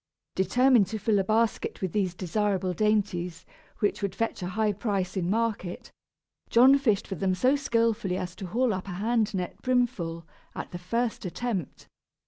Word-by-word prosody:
Determined 240 +3 +4
to 220 - -4
fill 210 0 +2
a - - +2
basket 220 +2 0
with 190 -3 -2
these 185 -3 0
desirable 190 0 -1
dainties, 185 -4 0 0.4
which 205 - +1
would 200 -2 -2
fetch 230 -1 -2
a 180 - -3
high 210 +3 0
price 195 -3 -2
in 180 -2 -1
market, 215 -4 -2 0.6
John 255 +4 +7
fished 220 -7 +1
for - - -5
them 190 +1 0
so 255 +9 +3
skilfully 230 -7 0
as 180 -1 -5
to 195 - -6
haul 240 +4 +1
up 190 0 -5
a 190 - -5
hand 220 +3 +1
net 180 -1 -4
brimful, 195 -10 0 0.3
at - - -6
the 175 - -6
first 230 +6 -2
attempt. 195 - -4
205 Hz, 170 wpm, -27 LUFS, 185-230 Hz, 0.6 s, John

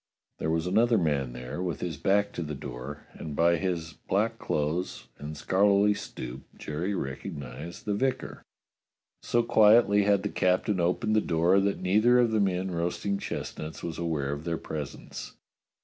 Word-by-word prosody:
There 80 - -1
was 80 +1 0
another 115 +5 +3
man 70 -8 0
there, 65 +7 -6
with 90 -2 -2
his 85 -3 -3
back 100 +7 +2
to - - -4
the 75 -2 -4
door, 65 +3 -7
and 75 -2 -7
by 85 +2 +4
his 85 -3 -2
black 115 +3 -1
clothes 75 +5 -2
and 75 +1 -6
scholarly 100 +3 +4
stoop 65 -9 -7 0.2
Jerry 85 +7 -3
recognized 75 +1 -6
the 105 - 0
vicar. 130 +5 -1 0.8
So 120 0 +1
quietly 105 -2 +6
had 100 -1 +3
the 105 - -1
captain 95 +2 +1
opened 90 +6 +1
the 110 - +4
door 85 +3 +3
that 100 0 0
neither 110 +7 +4
of 120 -2 +4
the 110 - +2
men 95 -1 0
roasting 90 +4 -1
chestnuts 80 -4 -5
was 85 -1 -4
aware 80 -5 -1
of 75 +1 -4
their 85 0 -1
pres 75 -4 -5
ence. - - -9
90 Hz, 165 wpm, -28 LUFS, 75-100 Hz, 0.8 s, quietly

